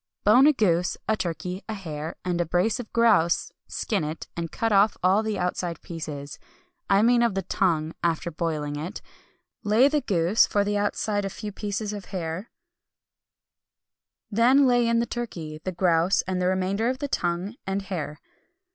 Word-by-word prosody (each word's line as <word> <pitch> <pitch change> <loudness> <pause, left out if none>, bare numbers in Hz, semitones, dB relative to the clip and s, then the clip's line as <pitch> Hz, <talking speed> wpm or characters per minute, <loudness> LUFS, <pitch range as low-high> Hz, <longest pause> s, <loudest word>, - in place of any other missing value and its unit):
Bone 245 +7 +6
a 305 - +6
goose, 180 -8 +1
a 220 - +3
turkey, 180 0 -4
a 220 - -2
hare, 160 -4 -6
and 175 -1 0
a - - 0
brace 180 +7 +1
of 240 - -7
grouse; 225 -8 +3 0.2
skin 205 -7 -2
it, 155 +2 -5
and 165 -1 -4
cut 225 0 -1
off 205 +1 +4
all 190 +3 +4
the 220 -1 -2
outside 180 -2 -2
pieces 150 -4 -7 0.5
I 195 +1 +4
mean 240 +1 +4
of 235 -5 +2
the 195 - -1
tongue, 165 -4 0
after 170 0 0
boiling 155 -3 -2
it 170 +8 -6 0.6
lay 215 +6 +5
the 295 0 +1
goose, 180 0 +3
for 205 - +1
the 205 0 -1
outside 205 0 0
a 195 - -2
few 210 +2 -6
pieces 205 +1 -3
of 205 -2 -7
hare; 180 +2 -5 1.8
then 250 +6 +5
lay 245 -2 +3
in 235 0 +2
the 235 - +2
turkey, 170 -11 -5
the 185 - -2
grouse, 175 0 +2
and 185 -1 -2
the 180 - +2
remainder 190 +5 0
of 255 - -2
the 285 +1 -3
tongue 180 -3 -1
and 195 +1 -1
hare. 165 -6 -4
190 Hz, 175 wpm, -25 LUFS, 170-220 Hz, 1.8 s, Bone